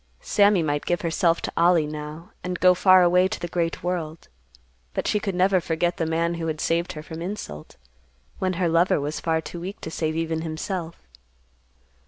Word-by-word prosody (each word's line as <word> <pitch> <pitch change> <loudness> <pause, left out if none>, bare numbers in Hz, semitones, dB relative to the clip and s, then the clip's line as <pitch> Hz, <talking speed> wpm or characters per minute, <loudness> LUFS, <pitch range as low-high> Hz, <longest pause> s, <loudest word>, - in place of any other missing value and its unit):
Sammy 200 -4 +3
might 145 -1 -2
give 175 -1 0
herself 170 0 +1
to - - -3
Ollie, 170 -2 +4
now, 150 +2 -7
and 180 0 -3
go 185 0 +6
far 185 0 +6
away 180 +1 +4
to 215 - -5
the 175 - -4
great 170 -1 -2
world, 170 -3 -4 0.7
but - - -1
she 210 - +2
could 195 -3 -3
never 185 0 +3
forget 170 +2 -1
the 165 - -1
man 165 +1 0
who 165 - -2
had 155 -1 -3
saved 170 +2 0
her 150 - -8
from 160 +1 -8
insult, 170 - -6 0.6
when 185 -1 0
her 175 0 0
lover 170 +1 +3
was 150 +2 -3
far 160 -1 0
too 170 - -8
weak 190 +3 -6
to 160 - -6
save 155 -1 -2
even 165 0 -1
himself. 165 - -5
170 Hz, 195 wpm, -24 LUFS, 160-180 Hz, 0.7 s, go